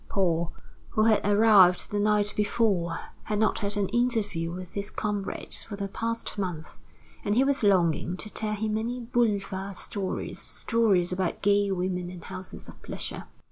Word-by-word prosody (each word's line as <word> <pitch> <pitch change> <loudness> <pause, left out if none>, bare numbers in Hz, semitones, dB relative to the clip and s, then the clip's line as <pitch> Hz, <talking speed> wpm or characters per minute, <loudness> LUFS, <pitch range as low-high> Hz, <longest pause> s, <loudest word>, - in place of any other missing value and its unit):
Paul, 170 -4 +1 0.4
who 215 - +2
had 220 -1 +4
arrived 205 -3 +5
the 205 - 0
night 210 0 +2
before, 205 -5 +1 0.3
had 210 - -1
not 215 +1 +2
had 205 0 -2
an 200 -1 +1
interview 220 -9 0
with 180 0 -7
his 200 0 -3
comrade 205 -2 -3
for 210 - -5
the 200 0 -3
past 230 +1 -3
month; 175 -5 -4 0.5
and 205 - +1
he 255 - +5
was 275 0 +1
longing 180 -3 +2
to 215 - -4
tell 215 -1 0
him 215 +1 -2
many 230 +3 -2
boulevard 205 -5 -1
stories 195 -2 -4
stories 205 -7 +1
about 180 -1 -2
gay 200 0 +3
women 180 -1 -2
and 180 -2 -9
houses 185 0 -8
of - - -13
pleasure. - - -6
205 Hz, 165 wpm, -27 LUFS, 185-220 Hz, 0.5 s, arrived